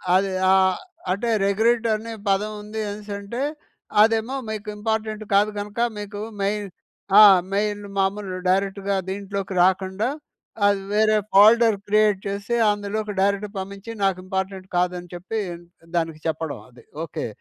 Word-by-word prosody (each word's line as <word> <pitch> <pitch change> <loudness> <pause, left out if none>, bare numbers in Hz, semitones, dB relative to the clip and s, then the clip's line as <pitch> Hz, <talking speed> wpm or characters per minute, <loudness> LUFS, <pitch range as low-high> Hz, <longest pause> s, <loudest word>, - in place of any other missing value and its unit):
అది 195 +1 +2 0.2
ఆహ్, 190 -1 +4 0.3
అంటే 205 +6 -1 0.2
రెగ్రెట్ 225 +4 +2
అనే 225 +2 -6
పదం 200 +2 +1
ఉంది 215 +1 -5
అనేసి 205 0 -7
అంటె, 205 +6 -4 0.6
అదేమో 225 +4 +2
మీకు 215 -1 -5
ఇంపార్టెంట్ 215 0 -2
కాదు 205 +2 +4
కనుక 205 +2 -6 0.2
మీకు 205 0 -6 0.2
మెయిన్ 205 +1 -1 0.5
ఆ! - - +11 0.3
మెయిన్ 205 0 -1
మామూలు 195 -1 -1
డైరెక్ట్‌గా 195 +1 0
దీంట్లోకి 195 0 -4
రాకుండా. 190 +4 +1 0.6
అది 200 -1 +2
వేరే 215 0 +4 0.2
ఫోల్డర్ 220 +3 +7
క్రియేట్ 210 -1 +3
చేసి 200 +4 -2 0.2
అందులోకి 205 +1 -3
డైరెక్ట్ 200 +1 +1
పంపించి. 200 +3 -7
నాకు 195 -2 +2
ఇంపార్టెంట్ 190 0 -3
కాదని 180 0 -1
చెప్పి 185 +6 -4 0.6
దానికి 165 -2 -2
చెప్పడం 160 -1 -3
అది. 120 -1 -18 0.2
ఓకే. 165 - -4
200 Hz, 130 wpm, -23 LUFS, 190-215 Hz, 0.6 s, ఆ